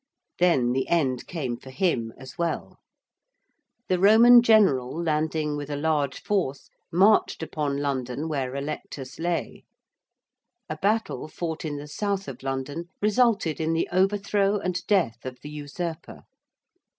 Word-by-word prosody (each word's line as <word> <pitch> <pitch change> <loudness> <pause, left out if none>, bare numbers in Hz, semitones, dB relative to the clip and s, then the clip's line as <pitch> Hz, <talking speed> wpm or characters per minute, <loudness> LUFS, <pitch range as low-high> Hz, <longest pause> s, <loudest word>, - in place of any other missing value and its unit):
Then 150 -9 +3
the 130 +1 0
end 135 -7 0
came 135 -9 -3
for 130 - -13
him 130 - 0
as 130 0 -11
well. 170 -1 -3 1.1
The 185 -1 +1
Roman 230 +5 +8
general 200 - +4
landing 155 -2 0
with 145 0 -5
a 145 - -2
large 145 -2 -1
force 185 -10 -2 0.2
marched 190 0 +3
upon 150 -3 -2
London 140 0 -2
where 135 -4 -2
Allectus 140 -2 -6
lay. 170 0 -2 1.0
A 155 - -5
battle 215 0 -1
fought 160 +1 -5
in 150 -2 -3
the 145 +1 -8
south 200 +4 -2
of 130 -3 -8
London 135 +5 -4
resulted 210 -7 +2
in 160 +1 0
the 165 - 0
overthrow 200 +2 +2
and 180 -2 -3
death 165 - +1
of 130 -1 -6
the 150 - -8
usurper. 160 +3 -6
160 Hz, 140 wpm, -25 LUFS, 140-185 Hz, 1.1 s, Roman